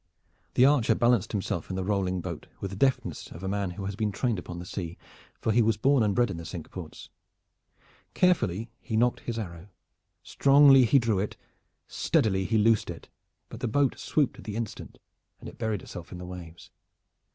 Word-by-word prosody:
The 125 - +6
archer 140 -5 +4
balanced 120 -4 +2
himself 95 -5 -3
in 95 - -3
the 95 - -2
rolling 95 -2 0
boat 85 -3 -6
with 100 - -4
the - - -6
deftness 130 +6 0
of 85 - -10
a - - -2
man 100 -1 -1
who 95 +2 -6
has 100 0 -3
been 105 -1 -1
trained 110 0 -1
upon 85 0 -8
the 90 - -7
sea, 85 -2 -5 0.4
for 110 - 0
he 120 +2 +4
was 110 -2 +2
born 135 +3 +3
and 105 -3 +1
bred 120 -4 +2
in 90 - -5
the 85 - -7
Cinque 80 -1 -8
Ports. - - -9 1.0
Carefully 115 - +2
he 110 - -3
nocked 120 +2 +2
his 120 -1 -5
arrow, 85 -4 -6 0.6
strongly 140 -2 +6
he 140 - +4
drew 115 -6 +2
it, 105 - -3 0.5
steadily 95 -3 +1
he 110 +3 +1
loosed 110 0 +3
it, - - -8 0.4
but - - -10
the - - -1
boat 140 +3 +1
swooped 145 -4 0
at - - -12
the 105 - -5
instant, 115 -2 -6 0.4
and - - -10
it - - -11
buried 110 -4 -2
itself 85 -1 -9
in 90 - -7
the 90 - -7
waves. 85 -2 -10
105 Hz, 200 wpm, -28 LUFS, 95-120 Hz, 1.0 s, The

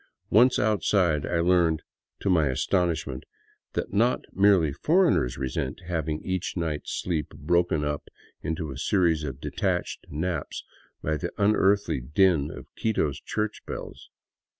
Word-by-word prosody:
Once 125 +5 +6
outside 95 -7 +2
I 85 - +1
learned 85 -3 +3 0.2
— - - -62
to - - 0
my 80 -5 +4
astonishment 80 -1 0 0.3
— - - -39
that - - -3
not 115 +5 +2
merely 95 -7 +4
foreigners 160 - +2
resent 65 +2 -3
having 80 -3 -2
each 95 0 -2
night's 80 -3 -3
sleep 80 -4 -1
broken 85 -3 +1
up 75 0 -3 0.3
into 80 -2 -3
a 65 - -7
series 85 -3 +2
of 70 -2 -5
detached - - -2
naps 85 +4 -3 0.4
by 80 0 0
the 85 +2 -3
unearthly 100 -5 +3
din 75 +2 +2
of - - -9
Quito's 80 -11 0
church 105 0 -3
bells. - - -7
85 Hz, 140 wpm, -26 LUFS, 75-95 Hz, 0.4 s, Once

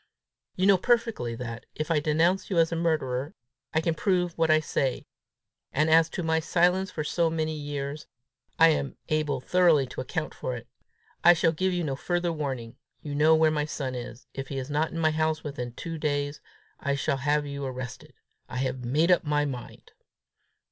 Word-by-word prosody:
You 185 - +1
know 195 -2 +6
perfectly 230 - +1
that, 115 -1 -7
if 155 +2 -3
I 160 - +4
denounce 160 +5 +1
you 190 - -1
as 165 0 +4
a - - -1
murderer, 155 -4 -1 0.4
I 160 - +1
can 165 0 +1
prove 180 +1 0
what 165 -1 +1
I 155 0 +6
say; 135 -4 -1 0.7
and 155 +3 +2
as 165 0 +6
to 175 - -4
my 160 0 +2
silence 180 +4 +2
for 155 -4 -4
so 165 +2 +1
many 160 -1 -1
years, 145 0 -5 0.5
I 165 0 +7
am 145 -3 -1
able 150 -3 0
thoroughly 165 -1 +4
to 130 - -6
account 155 +5 -3
for 125 - -4
it. 120 0 -9 0.6
I 175 - +9
shall 165 -1 +2
give 185 +4 0
you 175 -1 -1
no 140 -4 -1
further 175 +3 -1
warning. 130 -6 -4 0.3
You 145 - -5
know 155 +2 +5
where 160 0 +4
my 150 -1 0
son 135 -4 -4
is: 125 0 -7
if 135 0 -5
he 135 - -5
is 135 +2 -4
not 150 +2 +1
in 165 - -7
my 160 -1 +3
house 155 0 0
within 130 -5 -5
two 165 +5 -6
days, 145 -1 -1 0.4
I 140 0 0
shall 140 0 0
have 145 +2 +1
you 140 0 -5
arrested. 130 -2 -6 0.3
_I - - -7
have 130 -1 -2
made 150 +9 +2
up 180 - +4
my 150 -1 +1
mind. 125 -4 -7
155 Hz, 195 wpm, -27 LUFS, 135-165 Hz, 0.7 s, I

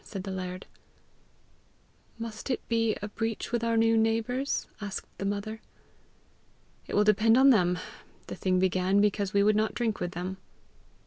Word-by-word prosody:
said 195 -3 -7
the 195 - -5
laird. 185 0 -5 1.5
"Must 230 +1 -6
it 255 - -2
be 225 -1 +1
a - - -2
breach 225 +1 -3
with 235 -1 0
our 230 0 +1
new 225 0 +4
neighbours?" 225 +5 0 0.2
asked 205 -2 -5
the 195 - -3
mother. 205 +2 -3 1.3
"It - - -4
will 210 - +5
depend 215 +2 +4
on 270 +1 +7
them. 180 -6 +3 0.5
The - - -7
thing 185 -1 0
began 185 +1 +2
because 205 -1 +1
we 200 0 +3
would 210 +1 +4
not 215 +1 0
drink 230 -3 -1
with 175 0 -3
them." 185 +2 -4
215 Hz, 165 wpm, -28 LUFS, 190-225 Hz, 1.5 s, on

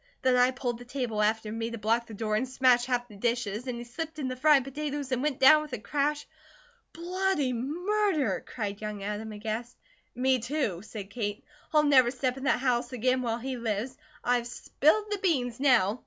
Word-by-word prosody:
Then 260 -1 +4
I 250 0 +5
pulled 250 -2 -3
the - - -9
table 245 -4 -2
after 215 0 +1
me 225 +1 -3
to 230 - -6
block 230 +2 0
the 220 - -9
door, 215 0 -1
and 250 +4 -1
smashed 255 -2 +3
half 245 -1 0
the 210 - -14
dishes 235 +1 -2
and 245 -2 -3
he 240 - -6
slipped 315 +6 -6
in 275 -4 -2
the 255 - -3
fried 285 +1 +5
potatoes 285 0 -4
and 255 -1 0
went 290 -2 -1
down 305 +3 +8
with 300 -3 -9
a - - -1
crash 290 +6 -1 0.3
" 485 -1 -32
"Bloody 350 -5 0
Murder!" 345 - 0
cried 205 -3 -5
young 210 -2 -5
Adam, 210 +2 -4
aghast. 220 +3 -5 0.4
"Me, 260 +1 +2
too!" 235 - -2
said 205 -2 -8
Kate. 205 -2 -3 0.3
"I'll 305 -1 +4
never 265 -4 +5
step 255 0 -1
in 270 +1 -7
that 260 - +3
house 250 -2 0
again 255 +1 +1
while 230 -2 -1
he 255 +2 -4
lives. 230 +2 -2 0.3
I've 245 -1 +1
spilled 320 - +1
the 410 - -1
beans, 255 -11 0
now." 245 -5 +3
250 Hz, 205 wpm, -28 LUFS, 225-280 Hz, 0.4 s, down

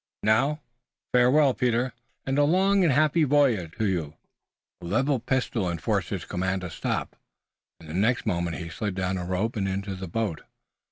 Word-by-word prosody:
Now, 135 +8 +2 0.5
farewell, 130 +3 +5
Peter, 125 0 0 0.3
and 135 +1 0
a - - +5
long 190 +5 +3
and 165 - +4
happy 155 +4 +3
voyage 130 - +2
to 110 - 0
you!" 85 -6 -1 0.7
A - - -8
leveled 120 +6 0
pistol 125 -7 0
enforced 85 -2 -1
his - - -4
command 95 +1 -2
to 90 -2 -6
stop, - - -3 0.6
and 80 - -14
the 80 - -7
next 110 +7 +1
moment 85 -5 -1
he 85 - -6
slid 105 +3 -4
down 95 0 -1
a 90 - -4
rope 95 +6 -1
and 100 -3 -1
into 100 +1 -3
the 95 0 -6
boat. 105 -2 -2
110 Hz, 175 wpm, -26 LUFS, 90-135 Hz, 0.7 s, farewell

